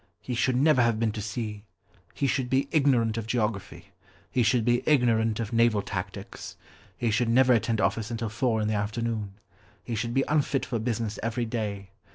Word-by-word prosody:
He 125 - -5
should 125 +2 +1
never 140 0 +4
have 115 -2 +2
been 115 -1 +1
to 105 - -5
sea. 105 -1 -5 0.5
He - - -1
should 130 -1 0
be 135 +2 +1
ignorant 125 -8 +2
of 110 - -6
geography. 110 -4 -3 0.4
He 125 - +1
should 115 0 +2
be 120 0 +3
ignorant 115 -6 +3
of 115 -1 -4
naval 115 -3 +3
tactics. 95 -3 -6 0.4
He 120 -2 0
should 115 +2 +1
never 125 +2 +5
attend 115 -1 +1
office 110 0 0
until 115 -1 -3
four 115 0 0
in 105 - 0
the 110 - 0
afternoon. 105 -1 -2 0.5
He 120 - -5
should 115 +2 -2
be 135 - +3
unfit 145 -2 +1
for 120 - -2
business 110 -2 -2
every 115 +2 -1
day. 105 -4 -4
115 Hz, 190 wpm, -27 LUFS, 110-125 Hz, 0.5 s, never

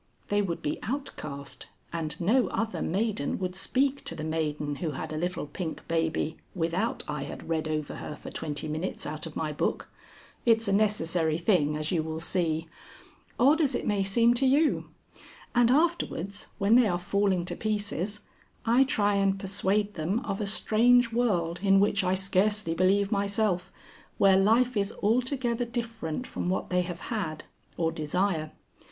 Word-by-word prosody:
They 205 0 +2
would 175 -4 -3
be 145 - -2
outcast, 155 - -5 0.3
and 165 -2 -3
no 230 +8 +3
other 225 0 -2
maiden 195 -4 -1
would 180 -1 -3
speak 270 +8 +1
to - - -2
the 155 - -5
maiden 150 -2 -2
who 160 -4 -3
had 135 - -5
a - - -3
little 175 +1 -2
pink 160 +2 -6
baby 160 -1 0 0.2
without 175 +5 -1
I 150 -2 -3
had - - -8
read 160 -1 -1
over 155 -1 -3
her 150 - -6
for - - -10
twenty 145 0 -4
minutes 155 +4 -3
out 155 +2 -5
of 155 - -11
my 155 -1 -2
book. - - -2 0.5
It's 225 -2 +3
a 200 - +2
necessary 175 -6 +2
thing, 170 -5 +2
as 155 0 -2
you 170 -3 +2
will 160 0 -4
see. 165 -2 -1 0.7
Odd 285 +7 +5
as 275 -4 +2
it - - -2
may 205 -2 +1
seem 230 +5 +4
to 260 +2 +2
you. 290 +4 +2 0.6
And 240 -1 +4
afterwards 260 - 0
when 200 +1 +3
they 245 -1 +6
are 175 -3 +1
falling 190 0 +1
to - - -4
pieces, 210 -1 -2 0.4
I 235 +4 +5
try 205 -5 +1
and 195 0 +2
persuade 200 +1 0
them 185 +8 -1
of 200 -3 -3
a 205 - -1
strange 235 +4 +4
world 180 -8 +1
in 195 -1 +5
which 200 0 +2
I 185 0 +2
scarcely 195 0 +1
believe 195 +4 +2
myself, 200 -2 0 0.5
where 195 -1 +6
life 230 +6 +3
is 200 -1 0
altogether 245 +2 +1
different 230 -5 -4
from 180 - -3
what 185 - -2
they 180 0 +3
have 175 -1 -5
had 160 -9 -3 0.3
or 165 -1 +1
desire. 160 +1 -1
195 Hz, 170 wpm, -28 LUFS, 165-220 Hz, 0.7 s, they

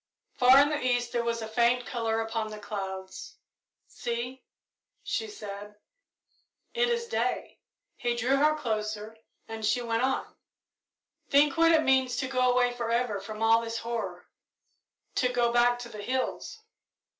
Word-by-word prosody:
Far 255 +1 +7
in 285 +1 +5
the 295 -3 -2
east 245 -1 +1
there 235 - 0
was 230 -1 -2
a - - -5
faint 235 +2 +2
colour 225 -2 -1
upon 225 0 -2
the 215 - -7
clouds. 190 -2 -6 0.5
"See," 245 +2 -4 0.6
she 445 - -2
said, 210 - -8 1.0
"it 485 0 +2
is 470 0 0
day." 470 - -2 0.4
He 240 -1 -1
drew 250 +3 +1
her 305 +2 +3
closer, 215 -3 -3 0.3
and 225 0 -7
she 215 +3 +1
went 230 0 0
on, 265 +1 0 1.0
"Think 285 0 +4
what 330 0 +5
it 320 -1 +4
means 260 -2 +2
to 260 - -2
go 255 -1 +2
away 245 0 +2
forever 235 -2 -1
from 215 +3 -6
all 225 +1 +5
this 230 0 -4
horror 220 -7 -4 0.9
to 250 - +3
go 240 -1 +1
back 240 0 +4
to 245 -1 -8
the 210 -2 -8
hills!" 260 - -3
240 Hz, 155 wpm, -28 LUFS, 225-260 Hz, 1.0 s, Far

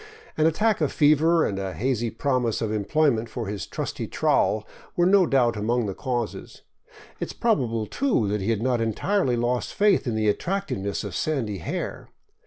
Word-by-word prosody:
An 155 0 +3
attack 210 +4 +1
of 150 - +1
fever 155 +3 +4
and 100 -1 -2
a 95 -1 -4
hazy 120 -1 -1
promise 125 -3 0
of 110 -2 -2
employment 115 +2 +1
for 115 +1 -5
his 100 -4 -5
trusty - - -4
trowel - - +1 0.3
were 175 - +3
no 190 -1 +5
doubt 125 -4 +2
among 115 +3 0
the 100 - -3
causes; 120 0 -4 0.6
it - - -2
is - - -8
probable, 120 - 0
too, 245 - 0
that 105 0 -1
he 95 - -2
had 115 -1 0
not 125 -2 +1
entirely 125 - 0
lost 120 +1 -1
faith 205 -8 +3
in 115 - -1
the 110 -1 0
attractive 195 - -1
ness 100 +1 -3
of 100 -3 -6
sandy 110 - -2
hair. 85 - -5
120 Hz, 185 wpm, -25 LUFS, 110-155 Hz, 0.6 s, no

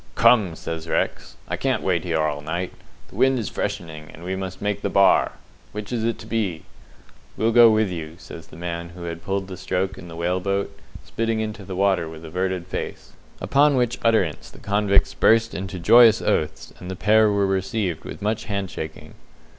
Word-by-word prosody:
"Come," 100 -9 +4
says 80 0 -6
Rex, - - -2
"I - - -3
can't - - 0
wait 90 -3 +1
here 85 -3 -1
all 75 -2 -1
night. 85 +4 -3 0.4
The - - -15
wind 130 +2 +4
is 110 -5 -3
freshening, 80 -2 -5
and 80 - -13
we 95 +1 -3
must 95 -1 -5
make 105 0 -2
the - - -1
Bar. 100 0 +4 0.4
Which 105 +1 -6
is 115 -2 -1
it 115 0 0
to - - -11
be?" 100 -8 -2 0.7
"We'll 115 +1 +2
go 120 0 +8
with 110 -3 +2
you!" 80 -2 -6
says 80 -3 -11
the - - -14
man 85 0 -5
who 90 - -9
had 85 -1 -6
pulled 95 +1 -2
the 95 -1 -7
stroke 95 +1 -2
in 90 - -10
the 85 - -9
whale 90 +2 0
boat, 100 +1 -2 0.3
spitting 115 -1 -1
into 110 -1 -4
the 95 0 -6
water 95 -4 +1
with 80 0 -10
averted 90 +2 -2
face. 90 - -6 0.3
Upon 145 +1 +3
which 125 -2 0
utterance 110 -9 +1
the - - -16
convicts 100 -1 +2
burst 115 0 +3
into 95 0 -5
joyous 115 +6 +7
oaths, 80 0 -1
and 90 - -8
the 95 - -4
pair 110 +3 +4
were 100 -1 +2
received 95 -3 -1
with - - -8
much 110 +1 -1
hand 100 -4 -3
shaking. 80 0 -7
95 Hz, 200 wpm, -23 LUFS, 85-110 Hz, 0.7 s, go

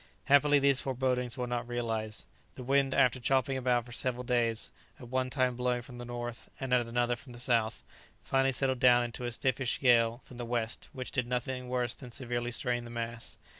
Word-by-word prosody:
Happily 145 +1 +5
these 140 -1 +3
forebodings 125 -1 -1
were 125 - -1
not 120 -1 -3
realized. 115 -3 -3 0.3
The 125 - -7
wind, 135 +1 +2
after 130 -1 +4
chopping 135 +2 +1
about 125 -2 +1
for 120 - -12
several 125 +1 -1
days, 120 -2 0 0.3
at 125 -3 -10
one 130 0 0
time 130 -2 +1
blowing 125 0 0
from 125 -1 -11
the 120 - -6
north, 120 -1 -6
and 130 -2 -2
at 120 -2 +3
another 120 +1 +1
from 125 +1 -13
the 120 - -10
south, 115 -3 +1 0.4
finally 135 0 +2
settled 130 -1 0
down 120 -2 +6
into 120 +1 -5
a 120 - -2
stiffish 130 +1 0
gale 120 -2 +4
from 125 - -13
the 120 - -4
west, 115 -1 -2
which 130 -1 -6
did 130 -3 -1
nothing 125 +1 -3
worse 125 -2 0
than 125 - -11
severely 120 -1 -3
strain 120 0 0
the 120 - -9
masts. 115 0 -5
125 Hz, 205 wpm, -31 LUFS, 120-130 Hz, 0.4 s, down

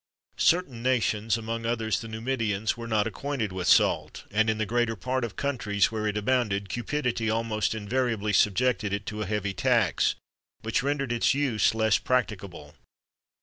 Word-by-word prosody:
[XXIII - - 0
6] - - +8
Certain 165 -9 0
nations, 115 -3 +1
among 115 0 -4
others 110 -4 0
the 115 - -7
Numidians, 110 -2 -1
were 115 0 -7
not 110 -2 +1
acquainted 115 -2 -3
with 90 -1 -4
salt;[XXIII - - +2
7] 105 - -1
and 110 0 +4
in 110 - +1
the 110 - 0
greater 120 +1 0
part 130 +5 -2
of 115 -4 -4
countries 105 -8 0
where 110 -1 -2
it 105 0 -1
abounded, 105 -4 0
cupidity 120 -1 -1
almost 110 -1 0
invariably 110 -1 -1
subjected 105 +1 +2
it 100 0 -3
to 105 0 -5
a 105 - -3
heavy 100 -1 -2
tax, 115 -5 +2 0.5
which 115 0 0
rendered 140 -2 -1
its 120 +2 +2
use 130 -7 +2
less 110 -2 +3
practicable. 100 -11 -2
110 Hz, 175 wpm, -27 LUFS, 105-125 Hz, 0.5 s, 6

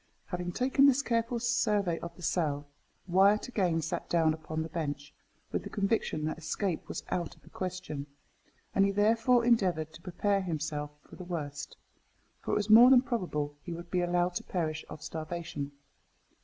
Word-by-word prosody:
Having 180 -1 -4
taken 270 +2 +4
this 275 0 +4
careful 230 -1 0
survey 210 -7 +1
of 170 - -7
the 175 - -13
cell, 150 -4 0 0.4
Wyat 195 +5 +4
again 180 -9 0
sat 165 - -3
down 160 -2 +3
upon 160 0 -4
the 160 - -6
bench 145 -3 -4 0.4
with - - -1
the - - -8
conviction 200 -7 0
that 155 +1 -3
escape 165 +2 -2
was - - -5
out 175 -2 -2
of - - -25
the - - -17
question; 180 -6 -5 0.7
and 195 - +4
he 200 - +4
therefore 230 +4 +3
endeavoured 180 -10 +2
to 155 - -12
prepare 195 +3 0
himself 155 -4 -3 0.2
for - - -13
the 185 - -7
worst, 145 -5 -5 0.6
for - - -2
it - - +3
was 210 -1 0
more 230 +3 +9
than 260 -1 +7
probable 160 - -2
he 170 - -6
would 170 +1 -9
be 180 - +2
allowed 175 0 +1
to - - -3
perish 160 -3 -2
of 155 -1 -9
starvation. 160 -3 -5
175 Hz, 180 wpm, -30 LUFS, 155-205 Hz, 0.7 s, more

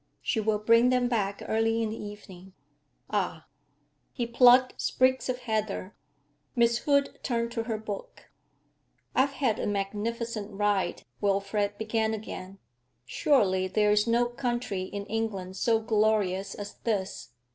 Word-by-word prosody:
She - - 0
will 215 0 +1
bring 230 +3 +4
them 250 -1 +2
back 200 -5 -1
early 225 +1 +1
in 215 - -2
the 220 - -6
evening.' 190 -3 -10 0.6
'Ah!' - - -1 0.7
He 240 - -2
plucked 250 +2 +5
sprigs 260 0 +2
of 250 0 -2
heather. 215 -3 -2 0.6
Miss 235 -1 +3
Hood 280 0 +1
turned 235 -2 -1
to 230 -1 -3
her 225 -2 -2
book. 210 -2 -8 0.8
'I've 275 +2 +2
had 250 -6 0
a - - -1
magnificent 210 +2 -3
ride,' 205 -1 0 0.2
Wilfrid 200 +1 0
began 220 0 0
again. 195 -2 -8 0.5
'Surely 190 - +2
there 210 +2 +2
is 210 +2 +3
no 235 +1 +3
country 240 -6 -2
in 200 +1 -6
England 200 -5 -3
so 225 +3 +2
glorious 210 -3 +1
as 205 0 -8
this. 195 - -2
220 Hz, 135 wpm, -28 LUFS, 200-235 Hz, 0.8 s, plucked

